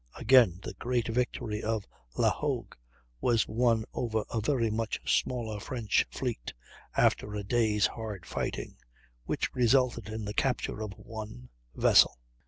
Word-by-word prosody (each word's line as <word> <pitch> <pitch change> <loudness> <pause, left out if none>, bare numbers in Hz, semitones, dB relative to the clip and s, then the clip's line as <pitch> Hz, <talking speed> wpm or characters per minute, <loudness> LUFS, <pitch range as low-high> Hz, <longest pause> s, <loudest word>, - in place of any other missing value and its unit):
Again, 115 -8 +5
the - - -5
great 120 -3 0
victory 115 -2 -1
of 110 -2 -1 0.3
La - - +4
Hogue - - -3 0.5
was 115 - +2
won 115 -1 +2
over 110 -3 -1
a 115 - -1
very 115 -2 +1
much 110 0 -2
smaller 115 -4 0
French 115 -1 0
fleet, - - -4 0.4
after 105 0 +2
a 105 - -3
day's 105 -1 +2
hard 105 -6 -4
fighting, - - -4 0.5
which - - -2
resulted 125 -3 +2
in 110 0 -4
the 105 - -4
capture 125 -2 -1
of 105 -2 -4
one 110 +4 -9 0.3
vessel! - - +5
110 Hz, 140 wpm, -30 LUFS, 105-120 Hz, 0.5 s, Again